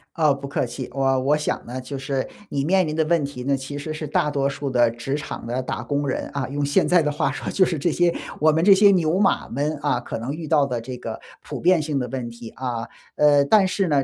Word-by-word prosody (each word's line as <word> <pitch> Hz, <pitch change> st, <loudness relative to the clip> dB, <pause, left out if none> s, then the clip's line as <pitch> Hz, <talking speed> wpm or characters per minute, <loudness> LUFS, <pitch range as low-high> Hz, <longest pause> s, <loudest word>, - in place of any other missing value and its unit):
哦， 155 Hz, -3 st, +3 dB
不 140 Hz, 0 st, -7 dB
客 140 Hz, -, -1 dB
气。 130 Hz, -, -6 dB
我 135 Hz, -1 st, +2 dB
我 140 Hz, +3 st, +3 dB
想 150 Hz, -, -3 dB
呢， 125 Hz, +2 st, -6 dB
就 140 Hz, +2 st, -6 dB
是 135 Hz, 0 st, -2 dB, 0.2 s
你 140 Hz, -, -1 dB
面 185 Hz, +4 st, +3 dB
临 155 Hz, -, -3 dB
的 160 Hz, -, +2 dB
问 165 Hz, -1 st, +2 dB
题 140 Hz, -3 st, -7 dB
呢， 140 Hz, 0 st, +2 dB
其 135 Hz, +2 st, -6 dB
实 155 Hz, +2 st, -5 dB
是 155 Hz, 0 st, -5 dB
大 150 Hz, +1 st, +1 dB
多 140 Hz, -2 st, 0 dB
数 140 Hz, 0 st, -3 dB
的 120 Hz, -2 st, +3 dB
职 120 Hz, +4 st, -4 dB
场 150 Hz, -, -6 dB
的 125 Hz, +2 st, -1 dB
打 -, -, -4 dB
工 145 Hz, 0 st, -2 dB
人 130 Hz, -, -2 dB
啊， 135 Hz, -2 st, -2 dB
用 145 Hz, +1 st, -2 dB
现 145 Hz, 0 st, +2 dB
在 180 Hz, -1 st, +5 dB
的 150 Hz, -1 st, 0 dB
话 145 Hz, -, 0 dB
说 -, -, -5 dB
就 190 Hz, -, +4 dB
是 165 Hz, -4 st, -2 dB
这 170 Hz, +4 st, +1 dB
些 175 Hz, +1 st, +2 dB, 0.3 s
我 155 Hz, +1 st, +5 dB
们 160 Hz, +2 st, +1 dB
这 195 Hz, +1 st, +8 dB
些 200 Hz, +1 st, +6 dB
牛 175 Hz, -1 st, +2 dB
马 200 Hz, -, +2 dB
们， 145 Hz, +5 st, -1 dB
啊， 145 Hz, -4 st, +1 dB
可 120 Hz, -, -6 dB
能 120 Hz, +4 st, -4 dB
遇 160 Hz, -1 st, -7 dB
到 145 Hz, -3 st, +3 dB
的 125 Hz, -3 st, -2 dB
这 125 Hz, +2 st, -7 dB
个 -, -, -6 dB, 0.2 s
普 -, -, -7 dB
遍 180 Hz, -1 st, +4 dB
性 150 Hz, -2 st, -2 dB
的 125 Hz, -2 st, -1 dB
问 125 Hz, -1 st, -4 dB
题 115 Hz, -1 st, -10 dB
啊。 120 Hz, -3 st, -4 dB, 0.3 s
呃， 145 Hz, -1 st, +5 dB
但 195 Hz, +5 st, +5 dB
是 190 Hz, 0 st, 0 dB
呢， 145 Hz, -4 st, +2 dB
145 Hz, 285 characters per minute, -23 LUFS, 130-155 Hz, 0.3 s, 这